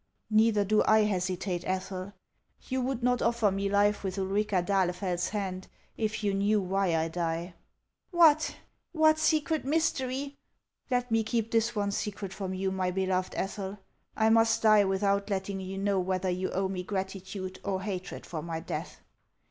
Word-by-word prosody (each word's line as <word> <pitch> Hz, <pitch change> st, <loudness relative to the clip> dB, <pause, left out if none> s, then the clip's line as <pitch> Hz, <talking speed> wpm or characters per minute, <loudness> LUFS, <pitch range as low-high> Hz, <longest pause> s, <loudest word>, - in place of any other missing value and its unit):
"Neither 215 Hz, -1 st, +4 dB
do 215 Hz, +2 st, +3 dB
I 220 Hz, 0 st, +6 dB
hesitate, 185 Hz, -3 st, -1 dB
Ethel. 185 Hz, +1 st, -3 dB, 0.5 s
You 260 Hz, 0 st, -1 dB
would 255 Hz, -1 st, -2 dB
not 250 Hz, -1 st, +2 dB
offer 230 Hz, -3 st, +2 dB
me 195 Hz, +1 st, -1 dB
life 205 Hz, +1 st, +2 dB
with 190 Hz, 0 st, -3 dB
Ulrica 195 Hz, -1 st, 0 dB
d'Ahlefeld's 180 Hz, -1 st, 0 dB
hand 190 Hz, -3 st, -4 dB, 0.3 s
if 220 Hz, -1 st, -2 dB
you 200 Hz, -1 st, +1 dB
knew 205 Hz, +2 st, +2 dB
why 190 Hz, -2 st, 0 dB
I 160 Hz, 0 st, +1 dB
die." 170 Hz, +1 st, -3 dB, 0.3 s
" -, -, -51 dB, 0.2 s
What? 325 Hz, -4 st, +5 dB, 0.4 s
What 315 Hz, -1 st, +4 dB
secret 315 Hz, 0 st, +1 dB
mystery 275 Hz, -2 st, -1 dB, 0.3 s
" -, -, -48 dB
Let 250 Hz, -1 st, 0 dB
me 225 Hz, 0 st, +3 dB
keep 225 Hz, 0 st, -1 dB
this 230 Hz, +1 st, +1 dB
one 205 Hz, -1 st, 0 dB
secret 200 Hz, -1 st, -4 dB
from 190 Hz, -1 st, -4 dB
you, 190 Hz, 0 st, -1 dB
my 185 Hz, -1 st, 0 dB
beloved 185 Hz, 0 st, -1 dB
Ethel. 195 Hz, 0 st, -3 dB, 0.4 s
I 220 Hz, 0 st, +4 dB
must 225 Hz, 0 st, +4 dB
die 215 Hz, -2 st, +6 dB
without 200 Hz, +1 st, +1 dB
letting 195 Hz, 0 st, -2 dB
you 190 Hz, 0 st, -6 dB
know 195 Hz, 0 st, +1 dB
whether 185 Hz, 0 st, 0 dB
you 185 Hz, +1 st, -2 dB
owe 190 Hz, +1 st, 0 dB
me 190 Hz, -1 st, -3 dB
gratitude 190 Hz, 0 st, -5 dB
or 190 Hz, -1 st, -2 dB
hatred 190 Hz, -2 st, -5 dB
for 160 Hz, -3 st, -5 dB
my 165 Hz, 0 st, -4 dB
death." -, -, -6 dB
195 Hz, 170 wpm, -29 LUFS, 185-220 Hz, 0.5 s, I